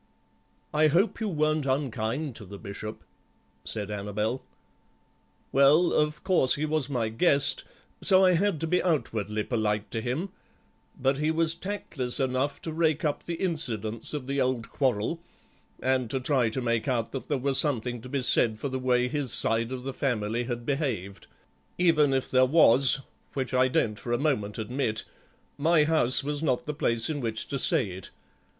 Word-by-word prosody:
"I 155 +1 +4
hope 185 +9 +1
you 215 - -1
weren't 155 -3 0
unkind 130 0 -2
to - - -10
the 100 +2 -10
Bishop," 110 +1 -8 0.6
said 105 -2 -4
Annabel. 105 +4 -3 1.1
"Well, 145 +6 +4
of 150 0 0
course 175 -9 +3
he 150 - -2
was 155 -3 -1
my 120 -5 -1
guest, 140 +4 +2 0.4
so 190 0 +6
I 185 - +5
had 185 -1 +1
to - - 0
be 180 +3 +1
outwardly 110 - -1
polite 105 -3 -2
to 115 - -2
him, 130 - -3 0.7
but 135 +1 +1
he 155 +1 +1
was 160 0 +3
tactless 170 -9 -1
enough 130 +2 -1
to 160 - -5
rake 160 -1 +1
up 150 - -2
the 170 - -2
incidents 120 - 0
of 140 -4 -5
the 140 +1 -1
old 125 -3 -1
quarrel, 130 +4 -1 0.6
and 130 -2 0
to 135 - -1
try 130 -3 +1
to 125 +3 -4
make 115 0 -1
out 120 -4 -1
that 135 - -6
there 145 - +1
was 135 +1 +2
something 125 -5 -1
to 125 - -10
be 135 -1 -2
said 110 -3 +4
for 135 - -4
the 130 0 -3
way 125 -1 +1
his 140 -3 -1
side 115 +2 +2
of 130 -1 -5
the 135 0 -5
family 120 -3 -1
had 120 -1 -5
behaved; 120 - -3 0.5
even 165 -5 +3
if 130 -1 -1
there 130 0 +4
was, 135 -2 +5 0.3
which 130 -2 -3
I 130 0 +4
don't 110 -4 0
for 120 - -4
a - - +2
moment 120 -8 -1
admit, 115 0 -2 0.5
my 160 +1 +4
house 150 -5 +2
was 145 +1 -3
not 135 -6 0
the 150 - -3
place 115 -6 +1
in 155 -2 -3
which 115 -3 -3
to 140 - -2
say 110 -5 +3
it. 90 0 -8
130 Hz, 180 wpm, -27 LUFS, 115-150 Hz, 1.1 s, so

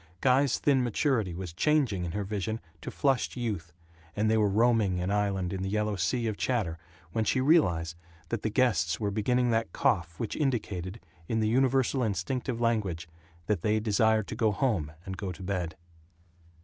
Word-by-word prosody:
Guy's 135 0 +3
thin 135 -3 +2
maturity 115 - 0
was 90 -2 -6
changing 130 - +1
in 85 - -4
her 105 +1 -1
vision 105 +2 -3 0.2
to - - -5
flushed 135 -2 0
youth 100 -9 -3 0.4
and 110 +1 +2
they - - +4
were 105 -2 +3
roaming 110 -3 +3
an 90 +2 -1
island 100 -3 0
in 95 - -3
the 95 - -2
yellow 105 0 0
sea 110 +7 0
of 110 -2 -2
chatter 100 -11 -1 0.3
when 110 - 0
she 130 - +1
realized 90 - +3 0.3
that 115 -3 -2
the 110 - -1
guests 100 - +2
were 105 -2 -1
beginning 120 +4 +1
that 115 0 0
cough 85 - 0
which 115 - -3
indicated, 105 - -2 0.3
in 115 - 0
the 110 - +2
universal 130 +2 +2
instinctive 120 +4 -2
language, 105 -9 0 0.4
that 105 +1 0
they 110 -1 +2
desired 110 0 +2
to - - -4
go 110 -1 +2
home 100 - 0
and 95 -1 -5
go 95 0 -4
to 90 +2 -9
bed. 90 -4 -2
110 Hz, 180 wpm, -29 LUFS, 95-120 Hz, 0.4 s, they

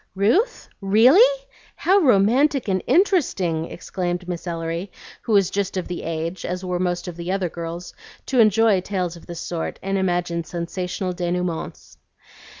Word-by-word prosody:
"Ruth? 280 - +1
Really? 305 - +5 0.3
How 390 +2 +3
romantic 255 - +3
and 190 -2 +1
interesting!" 250 - +2
exclaimed 180 0 -4
Miss 180 0 -5
Ellery, 165 +2 -4 0.3
who 225 - -2
was 195 -3 +4
just 200 -1 -2
of 185 - -3
the 180 - -5
age, 165 +2 -4
as 180 +1 -4
were 180 -1 -2
most 175 0 -1
of 175 - -6
the 170 +1 -4
other 190 -2 -1
girls, 170 +1 -7 0.3
to 260 - 0
enjoy 215 -2 +4
tales 180 -3 -3
of 170 - -14
this 170 -1 -6
sort 170 -2 -4
and 195 0 -1
imagine 175 -2 -1
sensational 180 +2 -4
denouements. 175 -1 -4
185 Hz, 150 wpm, -22 LUFS, 175-210 Hz, 0.3 s, Really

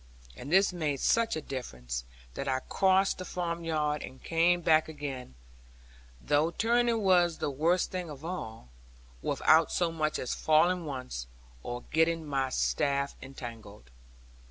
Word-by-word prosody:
And 140 - -8
this 190 +1 +4
made 150 -5 -1
such 230 - +2
a 155 - -3
difference, 60 - -5 0.3
that - - -5
I 130 -1 0
crossed 190 +4 +2
the - - -4
farmyard 165 -4 -2
and 130 - -10
came 175 +1 +2
back 160 -1 +3
again 140 - -6 0.8
(though 150 - +2
turning 230 +3 +1
was 175 -3 +4
the 145 - -2
worst 165 +6 +1
thing 180 -3 -4
of 150 +1 -9
all) 110 - -6 0.5
without 160 - +3
so 175 -2 +1
much 155 -2 -1
as 125 - -3
falling 170 +3 +3
once, 125 - -5 0.3
or 120 - -5
getting 160 0 +2
my 135 -2 -1
staff 140 +1 0
entangled. 115 - -10
155 Hz, 140 wpm, -30 LUFS, 130-175 Hz, 0.8 s, this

